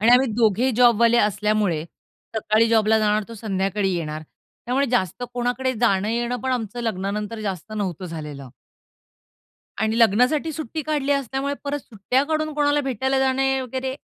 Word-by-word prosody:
आणि 225 Hz, +3 st, +4 dB
आम्ही 255 Hz, +2 st, +6 dB
दोघेही 230 Hz, +2 st, +2 dB
जॉबवाले 235 Hz, -1 st, +5 dB
असल्यामुळे, 210 Hz, -6 st, +1 dB, 0.5 s
सकाळी 220 Hz, +1 st, +2 dB
जॉबला 220 Hz, -1 st, +4 dB
जाणार, 215 Hz, 0 st, +2 dB
तो 230 Hz, -, -8 dB
संध्याकाळी 195 Hz, -2 st, -1 dB
येणार. 155 Hz, -2 st, -4 dB, 0.4 s
त्यामुळे 265 Hz, +3 st, +1 dB
जास्त 235 Hz, -, -1 dB
कोणाकडे 245 Hz, +1 st, -1 dB
जाणं-येणं 235 Hz, +3 st, +1 dB
पण 260 Hz, +2 st, -1 dB
आमचं 240 Hz, -1 st, -3 dB
लग्नानंतर 210 Hz, 0 st, -3 dB
जास्त 200 Hz, -1 st, -5 dB
नव्हतं 190 Hz, -4 st, -3 dB
झालेलं. 150 Hz, -5 st, -7 dB, 1.3 s
आणि 220 Hz, +2 st, 0 dB
लग्नासाठी 250 Hz, +8 st, +3 dB
सुट्टी 310 Hz, 0 st, -5 dB
काढली 290 Hz, -2 st, 0 dB
असल्यामुळे 275 Hz, +1 st, -1 dB
परत 285 Hz, +1 st, -2 dB
सुट्ट्या 240 Hz, +3 st, -1 dB
काढून 310 Hz, 0 st, -1 dB
कोणाला 290 Hz, 0 st, +2 dB
भेटायला 265 Hz, 0 st, -1 dB
जाणे 265 Hz, 0 st, +1 dB
वगैरे, 260 Hz, +1 st, -4 dB
230 Hz, 140 wpm, -23 LUFS, 210-265 Hz, 1.3 s, आम्ही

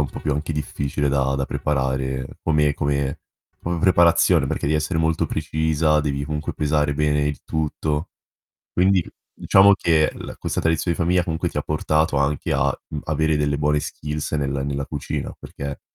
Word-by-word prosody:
un 70 Hz, -4 st, -1 dB
po' -, -, -7 dB
più 75 Hz, -, -1 dB
anche 75 Hz, +3 st, -2 dB
difficile 75 Hz, -1 st, -2 dB
da 70 Hz, -1 st, +1 dB
da 70 Hz, -, 0 dB
preparare 65 Hz, -2 st, -1 dB, 0.2 s
come 75 Hz, -2 st, +2 dB
come 70 Hz, -1 st, -1 dB, 0.4 s
come 85 Hz, 0 st, -2 dB
preparazione, 85 Hz, -2 st, +4 dB
perché -, -, -2 dB
devi 75 Hz, +2 st, +2 dB
essere 80 Hz, +2 st, -1 dB
molto 80 Hz, -1 st, +1 dB
precisa, 80 Hz, -1 st, +1 dB
devi 70 Hz, -1 st, -2 dB
comunque 75 Hz, +1 st, -3 dB
pesare 75 Hz, -1 st, +1 dB
bene 75 Hz, 0 st, +1 dB
il 75 Hz, -1 st, -3 dB
tutto. 75 Hz, +1 st, -2 dB, 0.6 s
Quindi 95 Hz, -1 st, +3 dB, 0.3 s
diciamo 100 Hz, +1 st, +5 dB
che 80 Hz, -4 st, +2 dB
l -, -, -8 dB
questa -, -, -2 dB
tradizione 80 Hz, +1 st, 0 dB
di -, -, 0 dB
famiglia 90 Hz, +1 st, +2 dB
comunque 80 Hz, -1 st, -1 dB
ti -, -, -4 dB
portato 75 Hz, 0 st, +1 dB
anche 70 Hz, +1 st, 0 dB
a, -, -, +2 dB, 0.2 s
mhmm, 75 Hz, -, -5 dB
avere 80 Hz, 0 st, +1 dB
delle 75 Hz, -1 st, 0 dB
buone 75 Hz, 0 st, +2 dB
skills 75 Hz, +1 st, -5 dB
nel 70 Hz, -3 st, 0 dB, 0.2 s
nella 70 Hz, 0 st, -2 dB
cucina, 75 Hz, -2 st, -4 dB
perché 70 Hz, 0 st, -7 dB
75 Hz, 170 wpm, -22 LUFS, 70-80 Hz, 0.6 s, diciamo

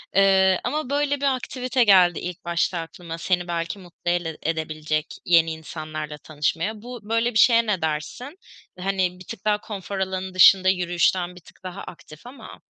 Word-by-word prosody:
Eee, 190 Hz, -1 st, +5 dB
ama 290 Hz, +2 st, -2 dB
böyle 285 Hz, 0 st, +1 dB
bir 275 Hz, -2 st, +2 dB
aktivite 255 Hz, 0 st, -1 dB
geldi 185 Hz, -5 st, +5 dB
ilk 175 Hz, -1 st, -7 dB
başta 170 Hz, +1 st, 0 dB
aklıma 165 Hz, 0 st, -8 dB
seni 175 Hz, +1 st, -1 dB
belki 170 Hz, +2 st, -3 dB
mutlu 175 Hz, -1 st, -5 dB
ele 170 Hz, -3 st, -2 dB
edebilecek 155 Hz, -1 st, -2 dB, 0.2 s
yeni 165 Hz, -2 st, +4 dB
insanlarla 155 Hz, -1 st, -7 dB
tanışmaya. 165 Hz, +8 st, -2 dB
Bu 245 Hz, 0 st, -8 dB
böyle 230 Hz, +2 st, +1 dB
bir 220 Hz, -, +2 dB
şeye 230 Hz, -2 st, +5 dB
ne 200 Hz, -5 st, 0 dB
dersin? 160 Hz, -, -4 dB, 0.4 s
Hani, 185 Hz, -1 st, -1 dB
bir 185 Hz, -, -12 dB
tık 190 Hz, -, -9 dB
daha 210 Hz, -1 st, +2 dB
konfor 200 Hz, -2 st, -6 dB
alanının 190 Hz, 0 st, -3 dB
dışında, 185 Hz, +1 st, +7 dB
yürüyüşten 180 Hz, 0 st, +1 dB
bir 180 Hz, -, -13 dB
tık -, -, -19 dB
daha 185 Hz, +1 st, -7 dB
aktif 155 Hz, 0 st, -13 dB
ama 260 Hz, +3 st, -12 dB
185 Hz, 170 wpm, -23 LUFS, 165-210 Hz, 0.4 s, dışında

